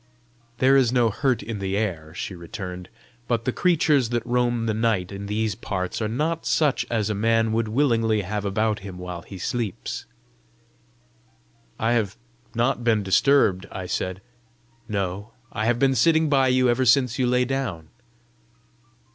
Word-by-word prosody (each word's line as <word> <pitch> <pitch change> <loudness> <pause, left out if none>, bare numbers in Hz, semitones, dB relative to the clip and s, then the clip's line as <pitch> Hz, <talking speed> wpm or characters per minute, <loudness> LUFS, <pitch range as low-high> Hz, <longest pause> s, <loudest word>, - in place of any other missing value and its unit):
"There 130 +2 +4
is 130 -4 +4
no 120 -3 +3
hurt 130 -2 0
in 110 0 -5
the 95 0 -2
air," 85 -8 -3
she 95 - -5
returned; 90 +1 -7 0.4
"but 115 -1 -1
the 130 - +1
creatures 150 -7 +2
that 120 -1 -1
roam 120 -1 0
the 110 - 0
night 105 -4 0
in 100 0 -6
these 110 +1 -1
parts 95 +1 -4
are 110 - 0
not 155 +9 -1
such 150 -4 +1
as 110 -2 0
a - - 0
man 115 +2 +2
would 115 0 0
willingly 115 -3 +2
have 105 +2 -3
about 105 +2 0
him 95 -2 -9
while 90 -1 -6
he 95 - -10
sleeps." 110 +2 -4 1.7
"I 115 +1 0
have 110 -4 0 0.4
not 120 +1 +1
been 110 -3 +2
disturbed," 100 -2 +3
I 95 - -5
said. 95 +2 -3 0.7
"No; 100 +1 -3 0.2
I 110 -1 -2
have 120 0 +2
been 135 +1 +3
sitting 160 +2 +3
by 135 -2 +3
you 130 0 +3
ever 120 +2 +2
since 125 -1 +3
you 125 - +2
lay 125 0 +2
down." 120 -12 -3
115 Hz, 165 wpm, -24 LUFS, 100-125 Hz, 1.7 s, There